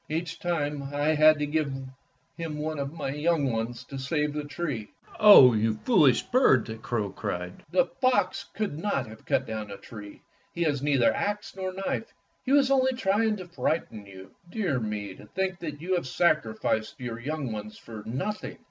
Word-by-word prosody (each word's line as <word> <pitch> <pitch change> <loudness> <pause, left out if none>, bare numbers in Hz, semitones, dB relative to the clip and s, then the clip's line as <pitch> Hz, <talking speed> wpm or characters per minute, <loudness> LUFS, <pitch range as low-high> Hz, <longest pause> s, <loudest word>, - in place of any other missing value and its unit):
Each 165 +2 -3
time 150 -5 -1
I 145 +2 0
had 155 0 +6
to 150 - -1
give 150 -1 0 0.6
him 165 -3 -5
one 155 0 -3
of 140 0 -3
my 150 -4 -4
young 150 -2 +1
ones 115 +2 -3
to 135 +1 -8
save 150 +2 -1
the 150 -1 -3
tree." 145 -8 -4 0.3
"Oh, 200 - +9
you 110 0 +1
foolish 155 - +5
bird!" 240 - +4
the 110 0 -6
crow 110 -3 -2
cried; 90 0 -5
"the 185 +10 +3
fox 255 -2 0
could 200 -9 -2
not 165 -9 -1
have 110 -1 -13
cut - - +1
down 110 -1 -5
the 100 -1 -8
tree. 105 -2 -11 0.3
He 170 - 0
has 145 -4 0
neither 140 -4 +3
axe 210 +1 -3
nor 190 -1 -3
knife. 195 +4 -3 0.3
He 260 - -2
was 275 -1 +4
only 260 -1 +3
trying 220 -2 +1
to 185 -2 -8
frighten 155 - -2
you. 95 -1 -12 0.2
Dear 175 - -1
me, 105 -3 -4
to 105 - -14
think 190 - -2
that 150 -4 -6
you 185 +3 -1
have 175 -7 0
sacrificed 110 -7 0
your 120 -2 -5
young 140 0 -3
ones 105 0 -6
for 110 -2 -9
nothing! 140 - -4
150 Hz, 185 wpm, -27 LUFS, 115-175 Hz, 0.6 s, Oh